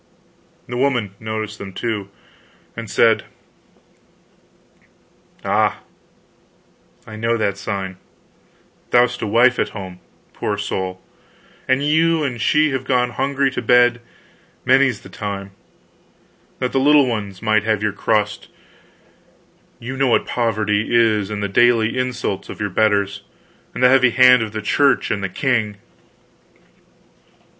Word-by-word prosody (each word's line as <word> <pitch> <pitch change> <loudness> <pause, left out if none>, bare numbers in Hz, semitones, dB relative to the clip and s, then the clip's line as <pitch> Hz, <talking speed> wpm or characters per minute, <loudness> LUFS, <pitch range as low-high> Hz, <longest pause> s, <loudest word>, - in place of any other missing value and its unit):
The 120 - -5
woman 125 -6 0
noticed 110 -1 -5
them, 100 -1 -8
too, 105 -3 -4 0.7
and - - -7
said: - - +3 2.2
"Ah, - - +1 1.2
I 110 - -10
know 115 +2 0
that 100 -3 -1
sign: 95 -2 -5 0.9
thou'st 120 0 +2
a - - -2
wife 120 +4 +3
at - - -2
home, 95 -2 -8 0.3
poor 105 - -3
soul, 95 -2 -4 0.7
and 130 +2 +1
you 160 +2 +2
and 125 -5 -3
she 150 +5 +3
have 135 -1 -2
gone 125 -2 +1
hungry 135 +2 0
to - - -4
bed, 120 +1 +3 0.6
many's 130 -3 +3
the - - -13
time, 100 -2 -6 1.1
that 125 -1 -2
the 135 - +1
little 145 +1 +5
ones 105 -6 -4
might 110 -1 +2
have 110 -1 0
your 105 -2 0
crust; 105 0 -1 1.3
you 125 +3 -7
know 135 0 +1
what 120 - +2
poverty 110 -3 -1
is, 110 -4 +2
and 105 -1 -4
the - - 0
daily 115 +2 +3
insults 125 -6 -3
of - - -8
your 105 -2 -3
betters, 100 -1 +1 0.5
and - - -2
the 125 - +7
heavy 130 -1 +5
hand 125 0 +6
of 110 -2 -3
the 110 0 -5
Church 140 +4 +2
and 100 -2 -2
the 95 - -2
king." 110 -1 -1
115 Hz, 135 wpm, -19 LUFS, 105-125 Hz, 2.2 s, the